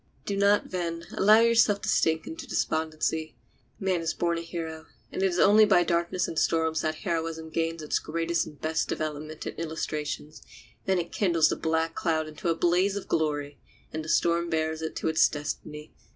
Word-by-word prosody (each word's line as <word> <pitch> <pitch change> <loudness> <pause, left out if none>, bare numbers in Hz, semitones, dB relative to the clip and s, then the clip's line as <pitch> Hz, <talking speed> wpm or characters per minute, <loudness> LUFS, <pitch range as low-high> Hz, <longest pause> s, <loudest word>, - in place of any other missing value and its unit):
Do 200 - -2
not, 200 +1 +3
then, 170 -2 -3
allow 215 +3 +6
yourself 225 -3 +4
to - - -3
sink 160 0 +2
into 160 - -7
despondency. 160 0 -1 0.4
Man 185 -3 0
is 165 0 -2
born 170 -1 0
a - - -5
hero, 165 -2 -6 0.2
and - - -3
it 195 - +4
is 180 -1 -2
only 210 +3 +6
by 195 -4 +5
darkness 170 +1 0
and 160 - -2
storms 160 -2 +1
that 155 0 -1
heroism 165 -2 -2
gains 165 0 -2
its 150 - 0
greatest 165 +1 -1
and 150 -2 -12
best 160 +1 -1
development 155 0 -4
and - - -6
illustrations; 155 -2 -4 0.4
then 190 -1 +2
it 175 -1 -3
kindles 170 -5 +3
the - - 0
black 160 0 0
cloud 160 -2 0
into 155 +3 -4
a 165 - +2
blaze 180 +4 +2
of 200 - -5
glory, 145 -2 -1 0.3
and 155 0 -3
the 155 - -7
storm 170 +1 +2
bears 160 -1 -1
it 160 - -4
to - - -2
its 160 0 +4
destiny. 150 0 -6
165 Hz, 190 wpm, -27 LUFS, 155-175 Hz, 0.4 s, allow